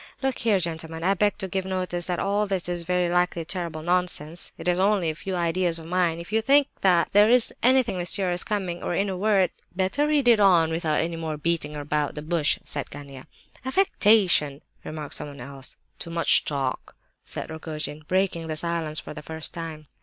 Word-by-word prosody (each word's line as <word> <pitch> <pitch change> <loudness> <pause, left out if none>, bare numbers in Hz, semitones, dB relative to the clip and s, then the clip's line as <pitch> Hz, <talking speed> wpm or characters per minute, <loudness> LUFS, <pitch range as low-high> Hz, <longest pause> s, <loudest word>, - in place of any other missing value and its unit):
Look 265 -2 -1
here, 220 -3 +3
gentlemen, 165 -1 -4
I 190 +2 +3
beg 205 +1 +1
to 195 - -4
give 190 +1 -2
notice 185 -2 -3
that 180 -1 -1
all 205 +3 0
this 190 -3 -2
is 175 -1 -2
very 180 +1 0
likely 175 -1 0
terrible 170 -3 -4
nonsense. 175 -2 0
It - - -6
is 180 0 +2
only 190 -4 +2
a - - -6
few 185 +4 -5
ideas 170 0 +1
of 165 - -7
mine. 175 -1 +1
If 170 +3 -9
you 220 - +3
think 280 +4 +4
that 180 -3 +3
there 205 +2 +6
is 245 -1 +4
anything 250 -6 +3
mysterious 180 0 0
coming—or 180 -4 -3
in 200 +2 0
a 190 - -3
word—" 195 -1 +2 0.2
"Better 190 +11 +1
read 265 -7 +4
on 175 -5 +5
without 160 -2 0
any 165 +1 -3
more 160 -2 -4
beating 150 -1 -1
about 150 0 -2
the 150 - -6
bush," 160 -2 +1
said 145 -2 -4
Gania. 140 -2 -10 0.4
"Affectation!" 210 - +3 0.2
remarked 155 -2 -6
someone 145 -1 -7
else. 135 -1 -10 0.2
"Too 170 - -7
much 165 0 +3
talk," 135 -3 -3 0.3
said - - -6
Rogojin, 155 -1 -5
breaking 185 -3 0
the 155 - -3
silence 165 -2 -1
for - - -8
the 150 - -8
first 160 +1 -4
time. 160 -2 -7
175 Hz, 190 wpm, -25 LUFS, 160-195 Hz, 0.4 s, there